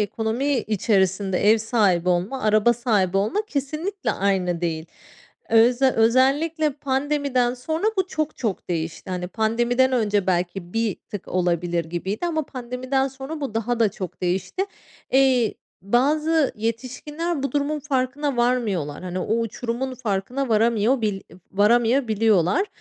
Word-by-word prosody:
ekonomi 225 +7 -1
içerisinde 195 -3 +1
ev 225 - +5
sahibi 210 -6 +1
olma, 180 +9 0
araba 215 +2 +4
sahibi 215 -6 +1
olma 210 - +1
kesinlikle 310 +6 -3
aynı 185 -3 0
değil. 165 -2 -2 0.6
Öz 235 +3 +4
özellikle 270 +6 +3
pandemiden 270 -2 0
sonra 315 +8 -3
bu 380 -1 +1
çok 310 -4 -3
çok 220 -6 -3
değişti. 165 +1 -4
Hani, 180 -1 -3
pandemiden 240 +5 +1
önce 210 -5 +1
belki 175 0 -1
bir 225 -3 0 0.2
tık 205 - -7
olabilir 175 -1 0
gibiydi 190 - -3
ama 315 -2 0
pandemiden 255 +2 -2
sonra 270 +4 -7
bu 270 -6 -4
daha 230 +1 -1
da 225 - +5
çok 185 -1 -7
değişti. 185 - -1 0.5
İii, 260 -4 +3 0.3
bazı 295 - +2
yetişkinler 260 +8 -3
bu 275 - -2
durumun 290 +1 0
farkına 275 0 -1
varmıyorlar, 220 - 0
hani, 185 0 -4
o 215 +5 0
uçurumun 235 +3 -3
farkına 245 +3 -2
varamıyorbil 220 -1 +2 0.3
varamayabiliyorlar. 220 - +3
230 Hz, 125 wpm, -23 LUFS, 195-270 Hz, 0.6 s, ev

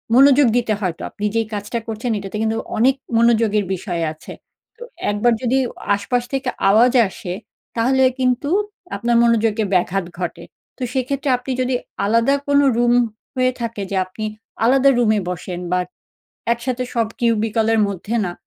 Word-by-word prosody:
মনোযোগ 275 0 +6
দিতে 230 -3 +1
হয় 185 -5 -1
তো, - - -12
আপনি 210 - -5
যেই 225 -1 +1
কাজটা 205 +3 -3
করছেন 225 +2 -3
এটাতে 195 +1 -5
কিন্তু 225 0 0 0.2
অনেক 260 +4 +4 0.2
মনোযোগের 225 -3 +3
বিষয় 175 -2 -3
আছে। 155 - -11 0.4
তো 485 - -9 0.3
১ 205 - -1
বার 240 -1 +5
যদি 255 +2 +2 0.4
আশপাশ 240 +5 -1
থেকে 265 -1 -1 0.2
আওয়াজ 235 +5 +5 0.2
আসে 180 -1 -6 0.4
তাহলে 260 +3 +2 0.2
কিন্তু 255 +3 +1 0.5
আপনার 240 0 0
মনোযোগে 225 -2 +2
ব্যাঘাত 180 +1 +1
ঘটে। 175 - -4 0.3
তো - - -17
সেক্ষেত্রে 270 +2 -1
আপনি 250 +2 -6
যদি 255 0 0 0.3
আলাদা 230 +6 +3
কোন 285 0 +4 0.2
রুম 240 0 +3 0.4
হয়ে 255 0 +2
থাকে 230 -3 -3
যে 195 - -1
আপনি 185 +4 -8 0.4
আলাদা 270 +3 +5
রুমে 215 -3 +3
বসেন 180 0 -5
বা 180 - +2 0.7
একসাথে 250 +1 -2
সব 230 -1 +2
cubicle 225 -1 +1
এর 220 - +3
মধ্যে 200 +4 -3
না 175 - -4
230 Hz, 160 wpm, -20 LUFS, 210-250 Hz, 0.7 s, মনোযোগ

